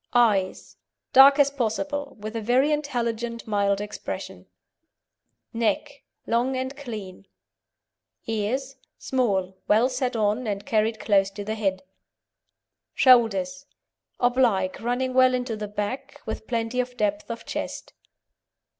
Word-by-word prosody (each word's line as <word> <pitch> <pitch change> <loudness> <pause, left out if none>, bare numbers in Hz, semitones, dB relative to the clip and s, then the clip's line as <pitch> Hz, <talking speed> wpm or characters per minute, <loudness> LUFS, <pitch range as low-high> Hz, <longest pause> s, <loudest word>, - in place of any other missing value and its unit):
EYES 210 -6 +1 0.4
Dark 275 +2 +9
as 285 -1 +4
possible, 280 +3 -3
with 215 +2 -6
a 225 - -2
very 255 +7 +3
intelligent, 235 -5 -2
mild 200 -2 +1
expression. 205 0 -6 1.1
NECK 235 +6 -1 0.2
Long 250 +3 +1
and 260 +2 -3
clean. 210 -9 -8 1.0
EARS 250 +5 -2 0.2
Small, 195 -8 0
well 225 +5 +4
set 255 -1 -2
on, 215 +2 0
and 205 -1 -3
carried 220 0 +1
close 200 -2 +3
to 200 +1 -7
the 215 +2 -3
head. 195 -3 -1 1.1
SHOULDERS 235 0 +4 0.5
Oblique, 245 -7 +2
running 250 +2 -1
well 255 0 +5
into 250 -2 -2
the 210 -1 -5
back, 260 +8 -5
with 220 0 -5
plenty 230 +1 -1
of 250 0 -2
depth 205 -2 -1
of 230 0 -6
chest. - - -5
230 Hz, 120 wpm, -25 LUFS, 210-255 Hz, 1.1 s, Dark